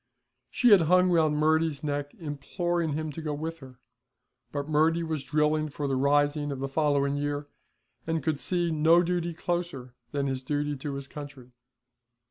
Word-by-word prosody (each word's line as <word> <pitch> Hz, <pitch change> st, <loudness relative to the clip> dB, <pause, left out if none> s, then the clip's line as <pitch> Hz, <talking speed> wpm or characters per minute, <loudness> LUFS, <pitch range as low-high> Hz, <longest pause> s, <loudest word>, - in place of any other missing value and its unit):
She 245 Hz, -, +3 dB
had 200 Hz, -4 st, +8 dB
hung 180 Hz, 0 st, +5 dB
round 155 Hz, -3 st, +3 dB
Murty's 155 Hz, -1 st, +1 dB
neck 145 Hz, -1 st, -3 dB
imploring 170 Hz, +2 st, -2 dB
him 155 Hz, +1 st, -3 dB
to 165 Hz, -, -7 dB
go 150 Hz, -2 st, -3 dB
with 165 Hz, +2 st, -5 dB
her, 130 Hz, -3 st, -13 dB, 0.7 s
but 145 Hz, 0 st, -3 dB
Murty 160 Hz, +2 st, +2 dB
was 160 Hz, -4 st, -3 dB
drilling 150 Hz, +2 st, +1 dB
for 145 Hz, 0 st, -4 dB
the 135 Hz, -, 0 dB
rising 145 Hz, +2 st, +2 dB
of 140 Hz, -, -4 dB
the 135 Hz, +1 st, -3 dB
following 140 Hz, -1 st, +1 dB
year, 145 Hz, 0 st, -2 dB, 0.6 s
and 160 Hz, -3 st, -1 dB
could 155 Hz, -1 st, 0 dB
see 175 Hz, -2 st, 0 dB
no 160 Hz, +3 st, +5 dB
duty 175 Hz, -1 st, -1 dB
closer 170 Hz, -8 st, -3 dB, 0.2 s
than 140 Hz, -1 st, -1 dB
his 135 Hz, -1 st, -2 dB
duty 145 Hz, +2 st, -2 dB
to 140 Hz, +1 st, -5 dB
his 140 Hz, -1 st, -6 dB
country. 140 Hz, -4 st, -10 dB
150 Hz, 170 wpm, -28 LUFS, 140-165 Hz, 0.7 s, had